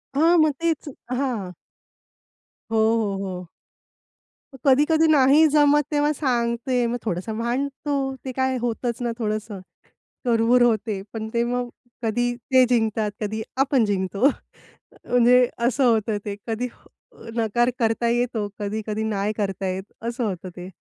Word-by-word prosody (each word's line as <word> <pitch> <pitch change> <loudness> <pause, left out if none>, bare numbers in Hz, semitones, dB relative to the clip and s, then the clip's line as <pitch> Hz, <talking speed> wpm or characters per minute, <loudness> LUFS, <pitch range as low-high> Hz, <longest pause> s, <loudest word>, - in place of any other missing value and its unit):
हां, 335 +4 +4
मग 310 -1 +4
तेच. 325 -3 -1 0.2
हां. 245 -8 -2 1.2
हो, 225 - +1 0.2
हो, 205 -4 -1
हो. 180 -2 -6 1.2
कधी-कधी 300 +4 +4
नाही 290 +2 +6
जमत 295 0 +4
तेव्हा 295 0 +2
सांगते. 245 -2 0
मग 240 +1 -2
थोडंसं 215 +3 -3
भांडतो, 270 +3 -2
ते 260 - -3
काय 260 0 +1
होतंच 240 0 -2
ना, 240 -1 -1
थोडंसं 215 -2 -3 0.7
कुरबुर 240 +1 +3
होते, 220 -3 +1
पण 220 -1 -5
ते 235 - +2
मग 245 0 -2 0.3
कधी 240 +2 0
ते 255 +1 +3
जिंकतात, 220 -3 +1
कधी 220 +1 -2
आपण 270 -3 +3
जिंकतो 195 +2 -1
अ, - - +3 0.8
म्हणजे 245 0 +5
असं 245 +3 +1
होतं 220 -3 +2
ते. 200 -1 -4
कधी 230 +2 -2 0.5
अ, - - -15
नकार 240 +2 +2
करता 230 0 +1
येतो, 235 -3 0
कधी-कधी 215 +1 -3
नाही 210 -1 -1
करता 195 -2 -2
येत 190 +2 -5
असं 240 +1 -2
होतं 185 -3 -4
ते. 180 +1 -8
235 Hz, 140 wpm, -23 LUFS, 215-260 Hz, 1.2 s, नाही